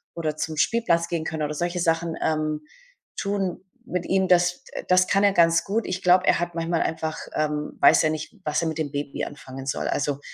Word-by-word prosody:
oder 155 -2 -2
zum 155 0 -3
Spielplatz 170 -5 +2
gehen 165 -2 -2
können 160 -1 -3
oder 150 - -2
solche 175 +3 -2
Sachen, 165 -1 0
ähm, 155 -1 0 0.6
tun 195 -3 -2 0.2
mit 180 -1 -3
ihm, 190 0 +2
das, 180 0 +3
äh - - -5
das 185 0 +5
kann 195 +1 +2
er 200 - +5
ganz 170 -1 +4
gut. 215 +3 -1
Ich 185 0 -3
glaube, 180 +1 +5
er - - +4
hat 175 0 -3
manchmal 165 0 0
einfach, 160 -1 -3 0.2
ähm 150 -1 -1
weiß 140 - +6
er 155 - +3
nicht, 155 +5 -5
was 150 +2 0
er 165 - -1
mit 160 - -5
dem 150 -3 -2
Baby 145 -1 -4
anfangen 135 -2 -9
soll. - - -2
Also, 140 0 -1
165 Hz, 215 wpm, -24 LUFS, 155-180 Hz, 0.6 s, weiß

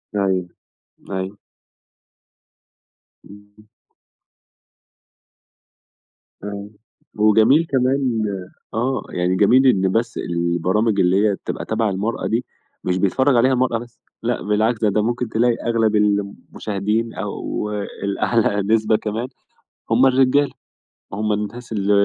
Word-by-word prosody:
أيوه، 95 -3 0 0.6
أيوه. 95 +1 -4 1.9
إمم. 105 +1 -17 2.8
أيوه، 100 0 -6 0.5
وجميل 110 +9 +5
كمان 130 -3 +1 0.5
آه، 120 +1 0
يعني 90 +1 0
جميل 120 +8 +5
إن 95 -6 +3
بس 115 +2 -1
البرامج 85 +5 0
اللي 95 +4 +3
هي 100 - 0
بتبقى - - -6
تَبع 110 0 0
المَرأة 100 +4 -2
دي 115 +2 -1 0.4
مش 90 0 0
بيتفرج 130 +8 +2
عليها 130 +3 +4
المَرأة 125 -2 +1
بس، 120 0 -13 0.2
لأ 120 0 -1
بالعكس 110 +2 +1
ده 110 - +3
ده 105 +1 +1
ممكن 120 +1 -1
تلاقي 120 +2 +2
أغلب 115 -2 +2
المشاهدين، 105 +1 -1
أو 105 - -4 0.3
الأعلى 100 +1 +1
نسبة 110 -1 +3
كمان 110 +3 -3 0.6
هُم 120 +4 +5
الرجالة، 135 +2 +3 0.6
هُم 105 +1 0
الناس 105 +4 -5
ال 100 -2 0
110 Hz, 110 wpm, -20 LUFS, 100-120 Hz, 2.8 s, وجميل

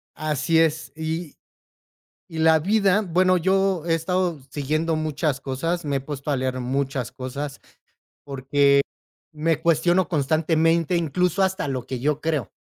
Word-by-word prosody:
Así 155 +2 +1
es. 160 -2 +1
Y 160 0 -4 1.0
y 160 - -7
la 160 0 +5
vida 200 +3 +2
Bueno, 185 -1 +2
yo 190 -1 +1
he 165 - +3
estado 175 0 -1
siguiendo 155 +4 -1
muchas 155 -3 -1
cosas. 165 +7 -2
Me 140 - -1
he - - -2
puesto 145 +1 -6
a - - +2
leer 130 0 -2
muchas 130 0 -2
cosas, 135 +2 -6 0.7
porque, 140 +1 +2 0.6
me 160 0 0
cuestiono 170 +3 +2
constantemente, 160 +2 +1
incluso 180 +3 0
hasta 190 -2 0
lo 130 -3 -3
que 130 - -4
yo 150 +3 0
creo. 155 -8 -2
155 Hz, 140 wpm, -23 LUFS, 140-170 Hz, 1.0 s, la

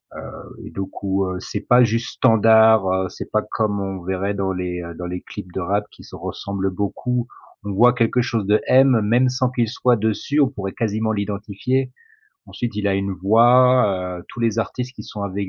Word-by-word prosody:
heu - - -10
et - - -10
du 95 - -5
coup, 95 0 -2
heu, 95 0 -4
c'est 105 - -5
pas 125 +3 +5
juste 115 0 -1
standard. 110 -2 +5
Heu, 95 0 0
c'est - - -9
pas 110 - +2
comme 105 -2 -1
on 95 -1 -4
verrait 95 +2 -2
dans 95 -1 -2
les, 90 -1 -4
heu, 85 0 -8
dans 90 +2 -7
les 90 +1 -5
clips 90 - -10
de - - -3
rap 100 +3 -1
qui - - -16
se - - -12
ressemblent 95 -1 -4
beaucoup. 120 +5 -2 0.4
On 100 - -4
voit 120 +5 +5
quelque 125 0 +1
chose 115 -4 -1
de 105 +1 +4
M, 130 -2 +5
même 120 +4 +3
sans 130 0 0
qu'il 120 -2 0
soit 125 +1 +2
dessus. 110 +7 -1
On 140 - +5
pourrait 95 -7 -6
quasiment 110 0 -1
l'identifier. 105 +6 -2 0.6
Ensuite 120 -3 -5
il 105 -1 0
a 100 - +1
une 100 0 -1
voix, 110 -2 +3
heu, 85 - -16
tous 120 - -9
les 115 -1 0
artistes 125 +3 -3
qui - - -9
sont 105 - -7
avec 100 0 -3
105 Hz, 210 wpm, -21 LUFS, 95-120 Hz, 0.6 s, pas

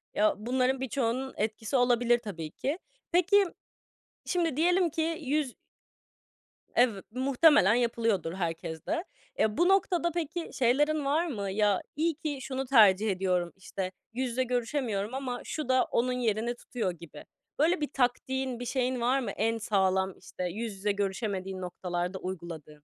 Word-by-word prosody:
Ya, 215 +1 +3
bunların 255 +4 0
birçoğunun 265 0 -1
etkisi 220 +3 -2
olabilir 240 -1 +3
tabii 165 -9 -6
ki. 295 +7 -3 0.3
Peki, 385 +3 +5 0.8
şimdi 335 -6 0
diyelim 350 +1 +3
ki 325 +1 -1
yüz 280 -2 0 1.2
Ev 240 -3 +4 0.2
muhtemelen 260 - +5
yapılıyordur 230 -8 +1
herkeste. 170 - -3 0.4
Eee, 215 -1 +2
bu 350 +2 +4
noktada 355 -3 +2
peki 335 0 -3
şeylerin 290 +4 +2
var 315 +5 +2
mı? 200 -9 -3
Ya, 205 -1 +2
iyi 320 0 +1
ki 295 -2 -3
şunu 265 0 -3
tercih 215 -5 +5
ediyorum, 180 -2 0
işte, 190 -1 -5 0.2
yüz 255 +1 -1
yüze 255 +2 0
görüşemiyorum 240 -3 -1
ama 260 -2 -3
şu 305 -5 -4
da 255 0 +4
onun 250 +2 0
yerini 235 -1 0
tutuyor 235 -6 -3
gibi. 170 -2 -12 0.3
Böyle 330 +2 +3
bir 295 - -1
taktiğin, 260 0 0
bir 245 - -5
şeyin 255 0 0
var 255 +3 +3
mı 245 - -3
en 225 +2 0
sağlam, 190 -3 +1
işte, 185 -1 -7
yüz 215 +2 -4
yüze 205 +2 0
görüşemediğin 195 -1 -2
noktalarda 180 0 -3
uyguladığın? 165 -5 -7
240 Hz, 145 wpm, -29 LUFS, 200-275 Hz, 1.2 s, Peki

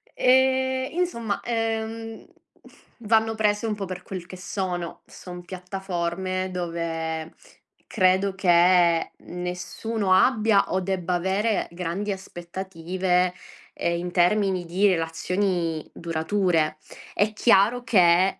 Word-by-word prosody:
Ehm, 260 0 +3
insomma, 235 - -1
ehm, 225 -1 -3 0.8
vanno 225 0 +2
prese 210 0 +1
un 220 - 0
po' 200 -1 -4
per 185 -1 -6
quel 185 -3 -7
che 185 - -10
sono. 180 -2 -4
Sono 180 -1 -10
piattaforme 185 0 -3
dove 165 -2 -3 0.5
credo 190 +1 +2
che 175 -2 +4
nessuno 180 +4 -3
abbia, 215 -1 +3
o 190 - +1
debba 185 -1 -2
avere, 195 +5 0
grandi 180 +4 -3
aspettative, 180 -1 -2 0.4
ehm, 170 0 -1
in 175 +1 -4
termini 185 0 +2
di 185 +5 +2
relazioni 165 -1 -1
durature. 165 -1 0 0.4
È 210 +1 +2
chiaro 225 +2 +4
che 185 -4 +4
185 Hz, 105 wpm, -25 LUFS, 175-210 Hz, 0.8 s, che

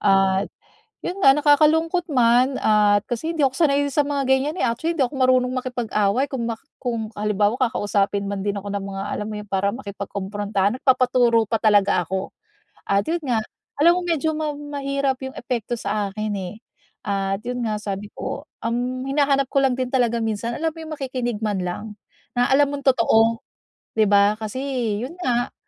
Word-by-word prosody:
at 195 -1 +3 0.5
yun 360 - -4
nga 270 -8 +7
nakakalungkot 310 +4 +3
man 250 +2 +4
at 210 -1 +4
kasi 260 +8 -2
hindi 320 - -2
ako 265 -1 +3
sanay 285 -4 +3
sa 290 +1 +1
mga 285 -1 -1
ganyan 265 +4 +2
eh. - - +3
Actually, 320 +9 -1
hindi - - +1
ako 270 +3 -7
marunong 255 -1 +3
makipag-away 245 -1 0
kung 250 -4 -3
ma 230 - -1 0.2
kung 230 -4 -3
halimbawa 210 +2 +1
kakausapin 205 -5 0
man 200 -1 -4
din 205 0 0
ako 205 - -7
ng 200 -1 -3
mga 195 0 -5
alam 210 - -3
mo 215 - -5
yung 210 - -14
para 200 +1 0
makipagkomprontahan 200 -1 -2
nagpapaturo 250 -4 +3
pa 225 - +2
talaga 205 -5 +3
ako. 190 +2 -3 0.6
At 200 0 +2
'yon 340 +2 0
nga, 225 -3 +1 0.4
alam 345 +2 +6
mo - - -5
medyo 320 -2 +1
ma 305 -1 -2
mahirap 280 -2 -2
'yong 265 0 -7
epekto 240 -1 -3
sa 210 -2 -2
akin 215 +1 -3
eh 185 +1 -6 0.5
at 195 0 -2
'yon 245 0 -3
nga 215 - -1
sabi 200 0 -4
ko, - - -5 0.2
ang 245 +3 -2
hinahanap 275 0 +2
ko 275 - +3
lang 270 -2 +2
din 255 -1 -3
talaga 235 -3 +1
minsan, 225 +2 -2
alam 325 +1 -1
mo 320 - -19
'yong 320 -1 -6
makikinig 250 -5 -3
man 205 -3 0
lang, 180 +3 -4 0.5
na 245 0 +3
alam 280 +1 +3
mong 280 -1 -5
totoo, 230 0 +3 0.5
'di 215 -2 +2
ba? 205 0 +5
Kasi 215 +3 -5 0.5
'yon 280 - -8
nga, 245 -5 0
240 Hz, 180 wpm, -22 LUFS, 205-275 Hz, 0.6 s, nga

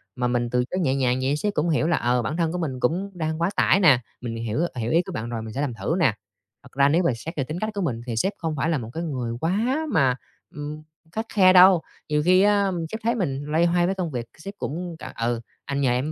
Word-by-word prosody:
Mà 125 -1 0
mình 120 -1 0
từ 125 0 +1
chối 185 - -1
nhẹ 135 -7 +1
nhàng 130 -2 +1
vậy 135 +2 +1
sếp 205 +7 -1
cũng 165 0 0
hiểu 155 0 +2
là, 165 - +2
ờ, 120 0 +1
bản 155 +7 -3
thân 165 -2 +1
của 180 - -3
mình 145 -7 -3
cũng 180 +11 0
đang 160 -2 -3
quá 170 - +2
tải 195 - +4
nè. 155 -10 +6 0.2
Mình 120 -2 -4
hiểu 115 +2 -3 0.2
hiểu 115 -2 -2
ý 165 - +4
của - - -8
bạn 110 +2 -4
rồi, 115 -2 -3
mình 110 -1 -7
sẽ 135 - -2
làm 140 -4 -1
thử 115 +8 -2
nè. 135 - +4 0.5
Thật - - -16
ra 140 +1 +4
nếu 165 +5 +3
mà 165 - +3
xét 165 +9 -7
về 140 - +1
tính 155 +6 -5
cách 215 - -1
của 200 - -3
mình 120 -10 -2
thì 120 -2 -3
sếp 190 - 0
không 160 -2 -3
phải 150 +3 0
là 165 - +1
một 115 -4 -6
cái 165 - -3
người 130 -7 -3
quá 230 - 0
mà, 130 -2 +3 0.4
ưm, 150 +1 -6 0.3
khắt 220 +5 -3
khe 185 -3 +6
đâu. 185 -1 +8 0.3
Nhiều 150 0 +2
khi 185 +1 +5
á, 200 -1 +3 0.2
sếp 220 - -4
thấy 235 +2 +1
mình 140 - -2
loay 160 +3 +2
hoay 175 0 +2
với 190 +2 0
công 180 -4 -3
việc, 120 -3 -3
sếp 195 +5 -8
cũng 170 +2 -4
c - - -9
"Ừ, 115 0 0 0.2
anh 140 0 -2
nhờ 130 -3 +3
em 130 +5 0
155 Hz, 280 wpm, -24 LUFS, 125-180 Hz, 0.5 s, đâu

